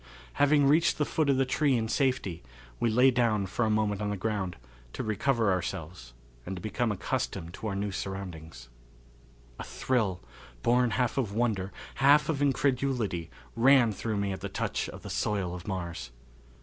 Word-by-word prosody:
Having 145 0 +5
reached 160 +5 +4
the 150 - +1
foot 155 -1 0
of 135 - +3
the 135 - +3
tree 135 0 +2
in 110 -1 -1
safety, 125 - 0 0.4
we 120 - +2
lay 125 +4 +5
down 115 -5 +1
for 100 +5 -1
a - - +1
moment 105 -1 +1
on 105 - -1
the 105 - -2
ground 95 -3 -2 0.4
to - - -4
recover 110 0 +1
ourselves 80 -8 -4 0.3
and 95 - -5
to - - -6
become 110 +4 -1
accustomed 85 -3 -3
to 110 - -6
our 100 - -2
new 100 +1 -2
surroundings. 85 -9 -6 0.9
A - - -4
thrill, 110 -8 -1 0.4
born 125 +1 +3
half 125 +3 0
of 110 -6 -1
wonder, 105 -5 0 0.3
half 145 +2 +5
of 145 -3 0
incredulity, 125 - 0 0.3
ran 125 -1 +5
through 105 +1 -3
me 100 0 -1
at 95 - -7
the - - -4
touch - - -2
of - - -10
the - - -6
soil 100 -4 -1
of 90 +2 -8
Mars. 85 -6 -4
110 Hz, 175 wpm, -29 LUFS, 95-130 Hz, 0.9 s, Having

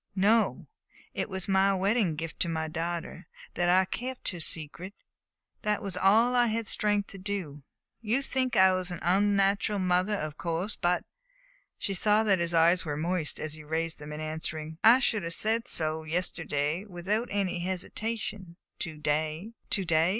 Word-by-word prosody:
"No. 215 +3 +2 0.5
It - - -3
was 190 -2 -4
my 195 0 +3
wedding 195 -2 +1
gift 160 +1 -6
to 170 - +1
my 160 -1 -2
daughter 165 +1 -4 0.3
that 175 0 +1
I 185 +1 +5
kept 250 +6 -4
her 175 - -5
secret. 165 +5 -2 0.7
That 210 -1 -1
was 195 -3 -5
all 215 +7 +4
I 245 -1 +4
had 225 0 -1
strength 205 -1 0
to 195 - -9
do. 185 -7 -4 0.4
You 230 +5 0
think 260 -2 -1
I 190 0 +6
was 185 0 -2
an 175 - -4
unnatural 200 +3 +2
mother, 185 +2 +1
of 155 -5 -5
course; 175 +5 -2
but 175 +1 0 0.4
" - - -31 0.3
She 195 - -3
saw 210 +3 +3
that 195 -4 +3
his 170 0 0
eyes 170 +2 +4
were 150 -4 -3
moist 165 0 -2
as 155 -1 -3
he 155 0 -9
raised 160 +2 -2
them 150 0 -8
in 150 +1 -6
answering. 155 0 -4
"I 240 +4 +7
should 220 -4 +1
have 165 -1 -2
said 225 +2 +2
so 155 -4 +3
yesterday 160 -1 -2
without 205 +4 -2
any 195 -3 -1
hesitation; 190 0 -4 0.2
to 160 -3 -5
day 155 +7 -2
" - - -40
"To 195 - +1
day?" 160 0 +3
185 Hz, 180 wpm, -29 LUFS, 165-205 Hz, 0.7 s, I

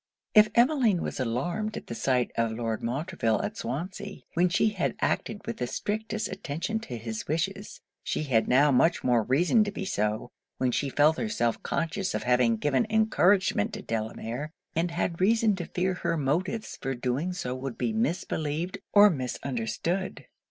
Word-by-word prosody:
If 215 0 +7
Emmeline 235 - +4
was - - -4
alarmed 170 - -2
at - - -7
the - - -6
sight 125 +1 +1
of 115 -1 +1
Lord 115 -1 -2
Montreville 125 -2 -1
at - - -3
Swansea, 185 - -5
when 175 +2 +3
she 205 +5 +3
had 195 -5 -1
acted 210 - -1
with 115 - -4
the 125 - -2
strictest 215 - -2
attention 190 +4 -3
to 130 - -7
his 110 -1 -5
wishes, 195 +6 -3 0.2
she - - -1
had 120 -6 +2
now 140 +4 +5
much 165 +7 +3
more 120 -2 +3
reason 170 - +3
to 205 - -3
be 200 -1 -5
so, 105 - -1 0.3
when 130 -1 +1
she 140 +3 0
felt 150 +4 +4
herself 120 - 0
conscious 185 +4 -2
of - - -2
having 125 -2 +3
given 145 - +1
encouragement 215 -1 +3
to 210 -1 -6
Delamere, 115 +5 -3 0.3
and 170 +2 +1
had 170 0 -2
reason 220 +1 +4
to 175 - -5
fear 185 +1 0
her 170 -2 -1
motives 180 +10 -1
for 135 0 -2
doing 130 +8 -1
so 125 -8 -3
would 130 -1 -5
be 225 - -1
misbelieved 175 -5 -1
or 205 0 +8
misunderstood. 130 +5 -3
165 Hz, 170 wpm, -28 LUFS, 125-200 Hz, 0.3 s, or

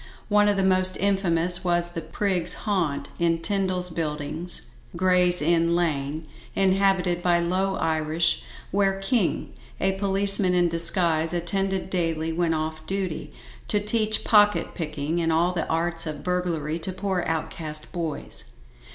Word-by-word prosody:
One 210 0 +4
of 205 - +1
the 195 - +1
most 185 0 +2
infamous 180 -3 +1
was 175 -1 +1
the 170 -1 -5
"prig's 175 +2 0
haunt" 155 -9 -1
in 170 -1 +2
Tyndal's 185 0 -1
Buildings, 155 +1 -3 0.3
Gray's 180 -1 +3
Inn 170 +1 +2
Lane, 155 -2 -1 0.3
inhabited 190 -2 +2
by 175 -1 +3
low 185 +3 0
Irish, 160 +1 0 0.3
where 195 0 +1
KING, 195 -1 0 0.3
a 190 - +2
policeman 195 -1 +3
in 175 -1 +3
disguise, 165 -1 +2
attended 190 +2 -1
daily 165 -2 -1
when 170 0 0
off 155 0 -4
duty, 190 -4 -3 0.4
to 210 - +3
teach 215 +1 0
pocket 210 -1 +4
picking 155 0 -3
and 165 0 +1
all 170 +3 +2
the 170 - -2
arts 165 0 0
of 150 -2 -5
burglary 170 -3 -1
to 185 - -4
poor 185 -1 -2
outcast 155 -1 -4
boys. 165 -4 -5
175 Hz, 140 wpm, -25 LUFS, 165-190 Hz, 0.4 s, One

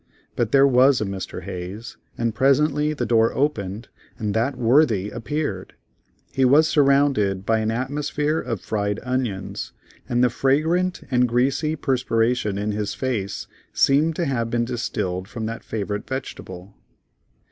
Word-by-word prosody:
But 115 -3 0
there 135 0 +6
was 130 0 +5
a 110 - -1
Mr. 95 -1 -6
Hayes, 95 +6 -7 0.2
and 115 -1 -1
presently 145 +4 +2
the 150 - -2
door 115 -1 +3
opened 110 -7 -1 0.3
and 105 -2 -2
that 120 +6 0
worthy 115 -5 +3
appeared; 120 -5 -4 0.6
he 135 - +1
was 145 +5 +5
surrounded 135 -10 +2
by 110 0 +2
an 110 0 -1
atmosphere 145 +5 -1
of 115 -6 -4
fried 105 -1 -2
onions, 125 -7 -3 0.4
and 120 0 +2
the 125 - +3
fragrant 160 +8 +1
and 125 -1 +3
greasy 135 +6 +1
perspiration 120 -6 0
in 105 +1 -1
his 105 -1 -3
face 115 -7 -3 0.3
seemed 150 +4 +3
to 170 - -1
have 115 -5 -1
been 120 0 0
distilled 95 -6 -3
from 110 +1 -5
that 115 +1 -5
favorite 105 -1 -4
vegetable. 100 -8 -7
120 Hz, 145 wpm, -23 LUFS, 105-140 Hz, 0.6 s, there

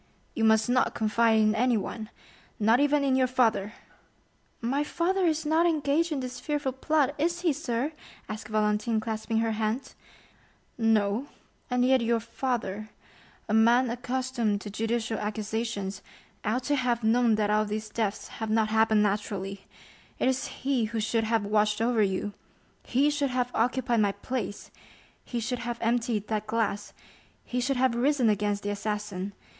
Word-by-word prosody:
"You 225 - -1
must 220 0 +4
not 250 +1 +2
confide 225 +1 +3
in 215 0 +4
anyone—not 225 0 -1
even 290 0 +3
in 270 -2 +2
your 260 -1 +3
father." 230 -5 +1 0.9
"My 265 +5 0
father 360 +4 0
is 315 -1 0
not 320 +3 +3
engaged 315 +1 +1
in 285 -3 -1
this 250 -1 -6
fearful 295 -2 -1
plot, 285 +1 +1
is 345 +3 0
he, 340 -4 +2
sir?" 270 -1 -2 0.4
asked 215 0 -6
Valentine, 215 +1 +1
clasping 220 0 -2
her 225 0 0
hands. 220 +4 -2 0.8
"No; 225 +2 +1 0.4
and 250 0 +2
yet 260 -1 +4
your 230 0 +2
father, 230 -3 -3 0.6
a 215 - -1
man 235 +3 +4
accustomed 245 -4 -1
to 205 - -7
judicial 225 +1 -1
accusations, 210 -2 -3 0.4
ought 225 +4 0
to 290 +3 +1
have 240 -2 0
known 230 0 +4
that 210 -1 +1
all 215 0 +3
these 215 +1 -4
deaths 215 -1 -2
have 220 -1 -3
not 220 0 +2
happened 220 -1 +3
naturally; 200 -1 -2 0.5
it - - +1
is 260 0 0 0.2
he 265 -4 +1
who 225 +1 -3
should 225 +1 0
have 220 -1 +1
watched 210 0 +2
over 230 0 +2
you—he 210 +7 -2
should 290 -1 0
have 250 -1 -1
occupied 245 0 +1
my 205 -2 +2
place—he 235 +2 -7
should 240 +2 -2
have 240 -1 -4
emptied 230 -2 0
that 215 -1 -2
glass—he 225 +2 -4
should 265 +1 0
have 255 -1 +3
risen 250 0 +2
against 205 0 0
the 205 - -1
assassin. 205 -2 -3
230 Hz, 150 wpm, -28 LUFS, 215-255 Hz, 0.9 s, must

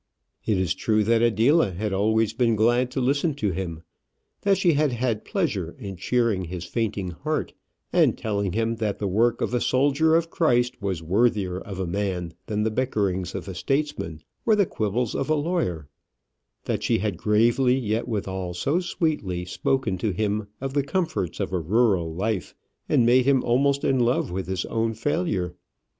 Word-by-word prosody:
It 105 - +2
is 95 -3 +1
true 110 -1 +1
that 115 +2 +3
Adela 120 - +3
had 100 +3 -2
always 110 +2 +2
been 120 -3 +2
glad 120 +3 +2
to 130 - -3
listen 140 +4 +1
to 105 -9 -1
him; 85 -2 -5 0.6
that 200 -1 +3
she 175 -3 +3
had 150 -1 +2
had 115 -3 -1
pleasure 115 - -2
in 100 -2 -7
cheering 105 0 0
his 90 0 -6
fainting 100 -3 -2
heart, 80 - -3 0.4
and - - +4
telling 100 -4 -2
him 115 +1 0
that 110 -3 -1
the 100 - -2
work 115 +5 +2
of - - -1
a 120 - +1
soldier 145 +5 +3
of 165 0 +1
Christ 120 -7 +1
was 95 -5 -2
worthier 95 0 +1
of 95 -1 -8
a 95 - -1
man 90 -2 -2
than 105 -1 -1
the 110 - 0
bickerings 100 -7 -1
of 95 - -5
a 95 - -5
statesman 135 - -2 0.2
or 220 - +4
the 205 -2 +3
quibbles 110 - -1
of 135 - -2
a 155 - +4
lawyer; 145 - -1 0.8
that - - -1
she - - +2
had 100 -1 -1
gravely, 120 +7 +3
yet 115 -2 -1
withal 95 -5 -3
so 140 - +1
sweetly, 150 - -2
spoken 110 0 -1
to 110 - 0
him 105 +2 -1
of 135 0 -4
the 145 - +2
comforts 140 - -2
of - - -2
a 90 - +1
rural 95 -1 +2
life, 95 +3 -2 0.3
and 120 - +4
made 125 +1 +5
him 135 -2 +3
almost 140 +3 +2
in 130 - +2
love 120 -6 +1
with 95 +1 -3
his 95 -1 -2
own 115 0 -1
failure. 115 - -1
110 Hz, 180 wpm, -25 LUFS, 95-130 Hz, 0.8 s, made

